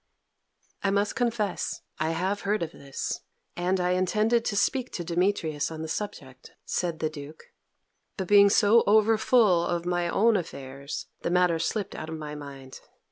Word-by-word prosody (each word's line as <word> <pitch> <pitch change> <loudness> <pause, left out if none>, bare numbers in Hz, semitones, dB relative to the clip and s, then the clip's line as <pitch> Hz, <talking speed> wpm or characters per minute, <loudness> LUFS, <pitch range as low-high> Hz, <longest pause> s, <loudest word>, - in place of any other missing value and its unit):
"I 200 - +1
must 200 +1 +1
confess 230 -6 -1 0.2
I 155 +1 0
have 185 +5 -1
heard 205 -2 0
of 165 - -5
this, 140 -1 -5 0.4
and 180 +2 0
I 180 0 +1
intended 215 +6 +2
to 205 - -1
speak 255 +4 +1
to 175 - -3
Demetrius 170 -4 0
on 160 -1 -6
the - - -4
subject," 145 -8 -6
said 170 -3 -2
the 155 - +1
Duke. 150 +1 -10 0.7
"But 190 -3 -3
being 200 0 +7
so 210 +3 +5
overfull 215 -3 +4
of 175 0 -2
my 175 -1 0
own 220 +4 +3
affairs, 140 -4 -6 0.2
the - - -1
matter 175 -2 +3
slipped 200 +4 -2
out 160 - -6
of 160 - -5
my 150 -1 -6
mind. 140 -3 -9
180 Hz, 165 wpm, -27 LUFS, 160-205 Hz, 0.7 s, being